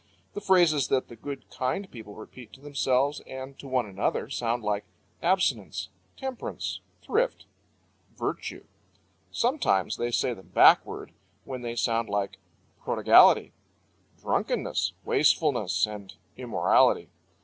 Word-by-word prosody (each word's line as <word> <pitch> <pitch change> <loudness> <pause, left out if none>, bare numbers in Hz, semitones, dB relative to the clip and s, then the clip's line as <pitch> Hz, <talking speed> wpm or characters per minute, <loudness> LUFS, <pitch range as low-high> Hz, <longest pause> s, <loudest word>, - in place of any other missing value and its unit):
The 205 - -5
phrases 170 -8 +4
that 130 -1 0
the 120 - -10
good, 140 +4 -8
kind 130 +10 -2
people 110 -4 -10
repeat 110 +1 -12
to - - -13
themselves 140 0 0
and 130 +1 -8
to 140 - -9
one 130 -2 0
another 100 +4 -2
sound 120 -2 -1
like 105 0 -1 0.4
"abstinence," 185 +2 0 0.3
"temperance," 265 -2 -5 0.2
"thrift," - - 0 0.7
"virtue." - - -4 0.7
Sometimes 230 - +1
they 120 - -1
say 120 +1 0
them 95 -4 -14
backward, - - +4 0.3
when 130 -2 -6
they 120 -1 -4
sound 115 -1 0
like 100 -1 -2 0.4
"prodigality," - - +5 0.7
"drunkenness," - - -1
"wastefulness," - - +2
and 105 -2 -9 0.2
"immorality." - - +2
125 Hz, 115 wpm, -27 LUFS, 110-145 Hz, 0.7 s, prodigality